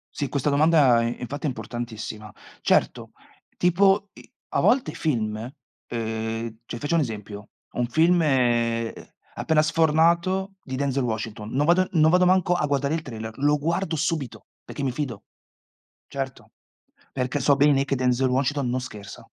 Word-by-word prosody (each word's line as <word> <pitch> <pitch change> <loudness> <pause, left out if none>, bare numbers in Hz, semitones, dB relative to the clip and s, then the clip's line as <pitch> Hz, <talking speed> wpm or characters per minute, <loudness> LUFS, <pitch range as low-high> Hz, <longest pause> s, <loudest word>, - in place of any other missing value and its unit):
Sì, 140 - -2
questa 140 +1 -1
domanda 145 -5 +4
i 115 +1 -3
infatti 135 +5 -6
è - - +2
importantissima. 115 -4 -6 0.3
Certo, - - +1 0.4
tipo 195 +3 +3
i - - -15 0.2
a - - 0
volte 255 +1 +3
i - - -11
film, 110 -9 -1
uhm, 115 -2 -6
cioè 120 - -6
faccio 155 +3 0
un - - +3
esempio, 105 -5 -6 0.2
un 125 - 0
film, 165 +8 +3
ehm, 120 -5 +1 0.4
appena 155 -1 +2
sfornato 170 +4 +2
di 130 - -6
Denzel 135 -1 0
Washington, 110 -2 -4
non 140 +3 +1
vado 175 +4 +4
non 160 -2 +4
vado 180 +1 +4
manco 185 -1 +3
a 175 - 0
guardare 140 +1 0
il 165 - -2
trailer, 110 -3 -8
lo 145 +1 +3
guardo 170 +3 -1
subito, 155 -4 -3 0.2
perché - - -7
mi 135 - 0
fido. 125 -6 -4 0.9
Certo, 135 -2 -6 0.6
perché 130 +2 -1
so 140 +1 +3
bene 140 -1 +3
che 140 - -1
Denzel 130 0 +1
Washington 135 +1 0
non 125 +1 -1
scherza. 105 -5 -10
135 Hz, 160 wpm, -24 LUFS, 115-160 Hz, 0.9 s, domanda